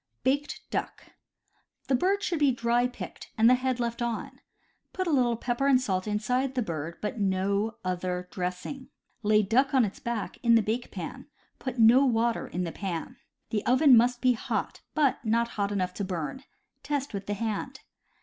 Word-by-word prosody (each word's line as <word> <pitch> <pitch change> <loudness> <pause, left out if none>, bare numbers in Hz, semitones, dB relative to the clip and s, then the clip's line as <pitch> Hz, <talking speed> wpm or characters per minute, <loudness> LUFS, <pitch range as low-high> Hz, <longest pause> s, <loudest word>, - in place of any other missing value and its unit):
Baked 285 +3 0
Duck. - - -3 0.4
— - - -40
The - - +1
bird 385 +10 +2
should 340 -3 -1
be 285 -2 +4
dry 240 0 +1
picked, 250 - -9
and 225 +1 +5
the 250 - +7
head 255 0 0
left 235 0 -2
on. 235 -2 -3 0.5
Put 370 - -2
a 340 - 0
little 245 -5 +3
pepper 245 +3 -1
and 265 -2 +5
salt 190 -6 -1
inside 250 +6 0
the 250 - +1
bird, 165 -3 -5
but 215 +3 -3
no 200 +3 0
other 180 0 -2
dressing. 185 +9 -5 0.3
Lay 210 -1 +4
duck 260 +7 +2
on 255 -3 +5
its 200 - -6
back 235 -3 -4
in 235 -2 +5
the 225 - +4
bake 230 +4 -2
pan. - - -7 0.3
Put 260 -2 -5
no 235 +4 +7
water 235 -2 +1
in 180 - -3
the 170 - -3
pan. 175 -4 -5 0.3
The 210 -1 0
oven 260 +2 +6
must 240 +1 +3
be 255 -1 +4
hot, 225 - -3
but 290 -6 +2
not 235 +1 +1
hot 200 -2 -2
enough 185 -3 -1
to 200 - -4
burn; 185 - -4 0.4
test 285 -3 -2
with 195 -1 -5
the 205 - -1
hand. 230 +5 -3
235 Hz, 190 wpm, -28 LUFS, 200-260 Hz, 0.5 s, the